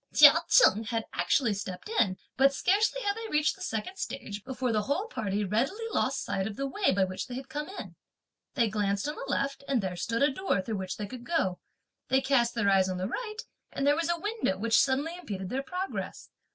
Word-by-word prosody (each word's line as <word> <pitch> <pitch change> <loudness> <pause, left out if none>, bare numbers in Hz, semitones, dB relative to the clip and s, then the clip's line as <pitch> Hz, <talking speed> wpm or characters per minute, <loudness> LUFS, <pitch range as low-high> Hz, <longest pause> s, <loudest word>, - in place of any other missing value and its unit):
Chia - - +10 0.2
Cheng 225 - +6
had 225 0 -2
actually 235 -6 +2
stepped 190 - -6
in; 215 - +1 0.2
but 275 +1 +4
scarcely 425 - +2
had 405 0 0
they 450 0 -6
reached 300 -2 +2
the 380 - -16
second 225 - -4
stage, 205 - -5
before 260 -1 -2
the 215 -1 +2
whole 285 - -1
party 210 - -2
readily 270 - -1
lost 270 +1 0
sight 190 0 -1
of 215 - -6
the 275 - -2
way 380 +9 +1
by 195 0 +2
which 185 0 -3
they 245 - -6
had 265 +1 -7
come 295 +4 -4
in. 395 - -8 0.6
They 235 -4 +3
glanced 205 +1 -1
on 300 - -2
the 275 -2 -6
left, 275 0 -1
and 270 -3 +2
there 190 -3 -3
stood 230 +8 -1
a 285 - +4
door, 375 - 0
through 210 +3 -3
which 190 -1 -4
they 210 - -3
could 245 +3 -9
go. 215 - 0 0.5
They 265 - +3
cast 245 -3 +2
their 230 -3 +1
eyes 190 -1 +4
on 185 - -2
the 185 +1 -2
right, 430 - -4 0.3
and 275 - -2
there 290 +1 +5
was 330 +1 -1
a 345 - +1
window 415 - -1
which 225 +3 +3
suddenly 280 +5 0
impeded 195 - -6
their 265 +5 -1
progress. 365 +7 -5
260 Hz, 225 wpm, -29 LUFS, 205-325 Hz, 0.6 s, Chia